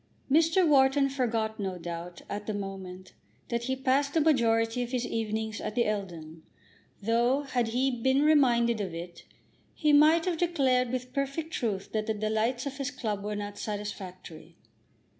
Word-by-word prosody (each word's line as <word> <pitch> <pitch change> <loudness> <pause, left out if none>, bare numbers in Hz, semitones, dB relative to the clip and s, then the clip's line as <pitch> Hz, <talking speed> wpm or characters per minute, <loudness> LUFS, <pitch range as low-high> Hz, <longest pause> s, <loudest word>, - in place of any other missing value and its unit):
Mr. 325 +4 +4
Wharton 275 -1 +4
forgot, 230 -5 -1
no 190 -2 -3
doubt, 170 0 -7
at 205 0 -5
the 215 - -2
moment, 190 -2 -7 0.4
that 235 0 -2
he 260 +1 0
passed 275 +2 +1
the - - +5
majority 235 -6 +2
of 245 - -3
his 250 -1 -1
evenings 220 -1 -3
at 215 - -4
the 240 - +2
Eldon, 170 -6 -4 0.6
though, 240 +6 +2
had 250 -4 -1
he 255 +4 +1
been 265 +3 +2
reminded 240 -7 +4
of 185 -4 -4
it, 170 +1 -8 0.5
he 300 -2 +2
might 310 +3 +6
have 350 -3 -1
declared 265 -8 +2
with 255 0 -4
perfect 280 +4 -3
truth 200 -5 -2
that 215 0 -2
the 220 - 0
delights 220 +4 -1
of 275 -1 -5
his 275 -2 -2
club 220 -6 -4
were 210 0 -3
not 205 0 -6
satisfactory. 195 -5 -7
235 Hz, 165 wpm, -29 LUFS, 205-270 Hz, 0.6 s, might